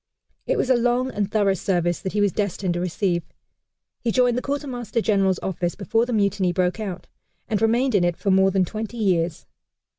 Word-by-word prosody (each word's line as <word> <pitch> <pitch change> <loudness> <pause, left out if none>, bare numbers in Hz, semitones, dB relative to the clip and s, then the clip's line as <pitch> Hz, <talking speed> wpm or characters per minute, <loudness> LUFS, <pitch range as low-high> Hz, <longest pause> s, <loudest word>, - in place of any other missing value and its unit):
It - - +1
was 260 - +1
a - - +6
long 245 +2 +1
and 205 -1 -2
thorough 205 -3 +3
service 175 -2 0
that 190 - -5
he 210 - +1
was 205 -1 +3
destined 195 -2 -1
to 175 - -2
receive. 180 0 0 0.8
He 235 - -1
joined 245 0 +3
the 250 - -1
Quartermaster 255 -6 -3
General's 195 -4 +2
office 175 -2 -2
before 225 +4 0
the - - -3
mutiny 200 -4 +1
broke 180 +3 0
out, 190 -5 -5 0.4
and 215 -3 -1
remained 240 +3 +2
in 195 -4 +3
it 175 -1 0
for 200 - 0
more 190 0 +5
than 190 -1 +2
twenty 220 +5 -6
years. 175 -6 0
200 Hz, 200 wpm, -23 LUFS, 180-230 Hz, 0.8 s, a